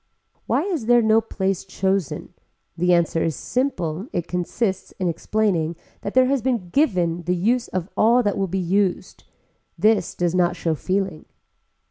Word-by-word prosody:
Why - - +2
is 335 - -3
there 240 -1 +5
no 220 +1 +4
place 195 -4 -2
chosen. 190 -3 -2 0.4
The 180 +2 +1
answer 170 -1 +2
is 160 -3 -1
simple 195 - -2
it 175 - -2
consists 190 +2 -2
in 185 - -2
explaining 170 -2 0 0.3
that 200 - -5
there 255 0 +6
has 270 0 +1
been 235 -8 -1
given 180 - +1
the 175 +2 -1
use 235 +7 +1
of 185 -2 -3
all 235 +3 +4
that 205 -2 0
will 195 -1 -1
be 190 +2 -2
used. 190 +1 -1 0.5
This 215 -4 +2
does 175 -1 0
not 180 -1 +2
show 165 - -1
feeling. 185 0 -2
190 Hz, 160 wpm, -22 LUFS, 175-225 Hz, 0.5 s, there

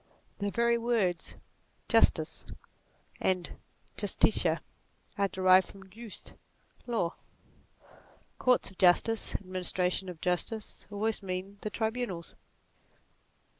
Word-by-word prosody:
The 200 0 0
very 235 +2 +2
words 220 -7 0 0.5
Justus - - +3 0.8
and 185 -2 0 0.5
justitia - - +2 0.5
are 200 0 +2
derived 185 -1 +5
from 190 -1 -14
jus, 225 +1 -8 0.6
law. 220 -8 0 1.3
Courts 250 -5 +3
of 190 - -20
justice, 200 +5 +3
administration 185 0 0
of 175 -3 -8
justice, 185 +5 -1
always 215 +2 -1
mean 190 +1 -5
the 215 - -3
tribunals. 220 -5 -3
195 Hz, 95 wpm, -30 LUFS, 185-225 Hz, 1.3 s, derived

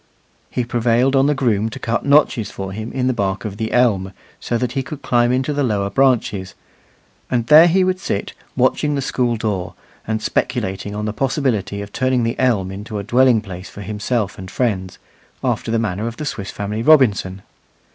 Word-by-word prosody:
He 125 - -1
prevailed 120 +3 +2
on 135 +1 +4
the 150 - +2
groom 110 -5 +1
to 115 - -8
cut 120 -2 -2
notches 140 -7 +3
for 95 -1 -6
him 110 +3 -6
in 130 -1 -1
the 130 - +2
bark 100 -2 -2
of 100 -2 -5
the 110 0 -3
elm 100 -6 +2 0.3
so 120 - -1
that 125 0 -2
he 135 - -1
could 145 +2 -8
climb 120 0 +2
into 130 +3 0
the 145 - -1
lower 100 -6 0
branches; 115 -7 +1 0.7
and 120 -2 0
there 155 +5 +8
he 185 +2 +3
would 185 0 0
sit 100 - -3 0.2
watching 150 -1 +1
the 140 - -1
school 120 -2 0
door, 100 -5 -3 0.3
and 110 0 -1
speculating 100 -1 -2
on 105 0 -3
the 105 - -2
possibility 120 -6 -1
of 100 - -11
turning 130 -1 +1
the 115 0 -2
elm 105 -8 +1
into 105 +3 -6
a 100 - -3
dwelling 120 +1 +4
place 95 -2 -9
for 100 - -10
himself 105 0 -2
and 95 0 -8
friends, 95 -6 -2 0.5
after - - -1
the 115 - +1
manner 110 -1 -2
of 115 0 -6
the 155 - -5
Swiss 100 -8 -4
Family 105 +2 -4
Robinson. 105 -9 +3
115 Hz, 195 wpm, -19 LUFS, 100-130 Hz, 0.7 s, there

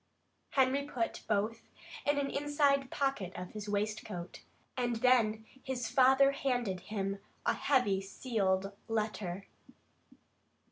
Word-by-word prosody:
Harry 265 +1 +3
put 250 -5 -3
both 215 +2 0 0.5
in 290 0 +3
an 280 -1 +1
inside 285 -2 +2
pocket 270 -12 -1
of 180 0 -6
his 210 -1 -6
waistcoat, 205 -3 -3 0.3
and 240 -2 0
then 225 -2 +3 0.2
his 250 -3 -3
father 265 +1 +6
handed 245 -9 -1
him 195 0 -3 0.3
a - - +3
heavy 205 -9 +2
sealed 195 -2 -1 0.2
letter. 210 -4 -2
225 Hz, 110 wpm, -33 LUFS, 200-265 Hz, 0.5 s, father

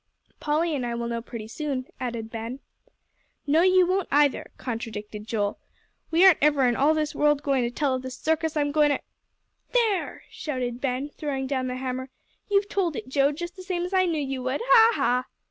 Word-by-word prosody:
"Polly 310 +2 0
and 265 - -2
I 240 -1 -2
will 235 0 -3
know 235 0 -3
pretty 225 -2 -8
soon," 270 +1 -3
added 230 -3 -4
Ben. 230 +3 -5 0.9
"No, 305 +3 +4
you 370 0 +5
won't, 370 +1 0
either," 290 -1 +2
contradicted 215 -3 -6
Joel. 205 -2 -1 0.5
"We 335 +3 +5
aren't 375 -4 +7
ever 290 -2 +4
in 240 -1 +2
all 295 +5 +3
this 305 -1 -1
world 295 -1 +2
goin' 275 -2 +2
to - - -1
tell 270 +2 0
of 255 - -2
the 260 - -6
circus 315 +4 -1
I'm 290 -1 +1
goin' 300 0 +4
to 285 - +1 0.4
" - - -41
"There!" 450 -6 +1
shouted 250 -5 -4
Ben, 270 +1 -1
throwing 280 -3 -4
down 260 -1 -1
the 250 - -3
hammer. 260 0 -4 0.4
"You've 400 0 +2
told 365 -7 -1
it, 255 - -6
Joe, 275 +1 +3
just 345 +4 -6
the 375 - -10
same 365 -2 -2
as 360 +2 -5
I 370 -1 +3
knew 325 -3 0
you 270 -2 -3
would. 260 - -2
Ha, 460 -1 +6
ha!" 250 +1 +1
280 Hz, 205 wpm, -26 LUFS, 250-320 Hz, 0.9 s, aren't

